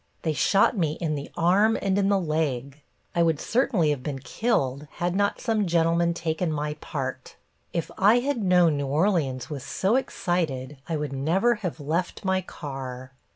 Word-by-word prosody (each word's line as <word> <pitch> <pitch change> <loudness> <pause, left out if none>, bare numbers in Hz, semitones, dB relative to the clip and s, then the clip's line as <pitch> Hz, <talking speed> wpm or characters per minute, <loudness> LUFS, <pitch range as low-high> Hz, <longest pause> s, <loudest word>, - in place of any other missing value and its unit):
They 160 - 0
shot 195 - +3
me 160 -6 +1
in 155 -1 -2
the 145 -1 -5
arm 195 +6 +4
and 195 -1 0
in 200 0 +2
the 200 -1 +3
leg. 150 -4 -2 0.3
I 170 - +2
would 165 -3 +2
certainly 220 - +2
have 145 -3 -2
been 140 0 -4
killed 140 - -1
had 175 +1 -2
not 200 0 +1
some 220 -4 0
gentleman 170 0 +2
taken 165 0 -1
my 150 0 -2
part. 130 -2 -5 0.4
If 170 -2 -3
I 205 +5 +6
had 255 -1 0
known 180 -5 +4
New 140 -1 -2
Orleans 145 - 0
was 140 -3 -4
so 200 +6 +1
excited 155 - -2
I 160 - 0
would 150 -2 -3
never 170 - +2
have 180 -5 -4
left 165 +7 -2
my 190 0 +2
car." 130 -6 -7
165 Hz, 175 wpm, -26 LUFS, 145-190 Hz, 0.4 s, I